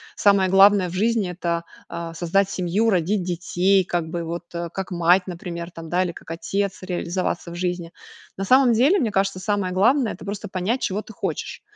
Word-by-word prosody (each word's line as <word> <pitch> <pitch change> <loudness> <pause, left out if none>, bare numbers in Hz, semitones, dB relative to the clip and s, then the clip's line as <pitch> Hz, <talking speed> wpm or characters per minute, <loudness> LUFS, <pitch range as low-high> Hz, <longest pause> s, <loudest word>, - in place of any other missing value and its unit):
самое 200 -2 +4
главное 195 -1 +6
в 170 - -9
жизни- 215 -1 +1
это, 170 -1 -2 0.3
а, 170 -1 -6
создать 180 +4 +1
семью, 190 +5 0
родить 185 0 +1
детей, 180 +2 +1
как 175 -3 -2
бы, 170 0 -3
вот, 170 +2 -5
э, 170 0 -4
как 190 0 -5
мать, 175 +2 +3
например, 170 -1 -6
там 165 -1 -9
да, 180 +2 +2
или 180 - -2
как 165 - -11
отец 195 +4 -2
реализоваться 180 -1 -3
в 170 - -7
жизни. 175 -1 -3 0.5
На 195 - -3
самом 255 +1 +5
деле, 280 - +4
мне 225 -6 0
кажется, 195 -1 0
самое 185 -1 -1
главное 235 +5 +3
это - - -11
просто 205 0 -5
понять 195 +8 -1
чего 200 +2 -1
ты 220 - -13
хочешь. - - -4
185 Hz, 195 wpm, -23 LUFS, 175-200 Hz, 0.5 s, главное